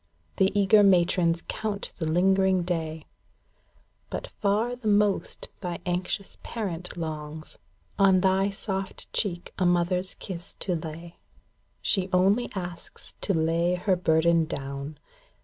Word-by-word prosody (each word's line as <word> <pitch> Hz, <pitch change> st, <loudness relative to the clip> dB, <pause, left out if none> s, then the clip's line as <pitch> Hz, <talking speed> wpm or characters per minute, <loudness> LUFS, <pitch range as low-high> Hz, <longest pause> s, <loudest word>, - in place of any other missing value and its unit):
The 190 Hz, 0 st, +4 dB
eager 205 Hz, +2 st, +6 dB
matrons 175 Hz, -3 st, +3 dB
count 210 Hz, -2 st, -3 dB
the 160 Hz, -, -2 dB
lingering 190 Hz, +2 st, +3 dB
day; 160 Hz, -3 st, -3 dB, 1.0 s
But -, -, -5 dB
far 215 Hz, +4 st, +1 dB
the 245 Hz, -3 st, -6 dB
most 205 Hz, -1 st, +1 dB
thy 175 Hz, -3 st, -4 dB
anxious 180 Hz, +2 st, -2 dB
parent 180 Hz, -6 st, -5 dB
longs 155 Hz, -1 st, -6 dB, 0.4 s
On 190 Hz, -2 st, +5 dB
thy 190 Hz, +1 st, +3 dB
soft 195 Hz, -1 st, -4 dB
cheek 175 Hz, -5 st, -2 dB
a 185 Hz, -, +2 dB
mother's 180 Hz, +1 st, +1 dB
kiss 175 Hz, -2 st, -2 dB
to 185 Hz, -, 0 dB
lay. 165 Hz, +1 st, -7 dB, 0.7 s
She 190 Hz, -2 st, +2 dB
only 195 Hz, +6 st, +3 dB
asks 175 Hz, -2 st, -7 dB
to 195 Hz, -, 0 dB
lay 165 Hz, +2 st, +2 dB
her 185 Hz, +1 st, +1 dB
burden 165 Hz, -1 st, +3 dB
down. 140 Hz, -1 st, -5 dB
180 Hz, 125 wpm, -27 LUFS, 165-195 Hz, 1.0 s, eager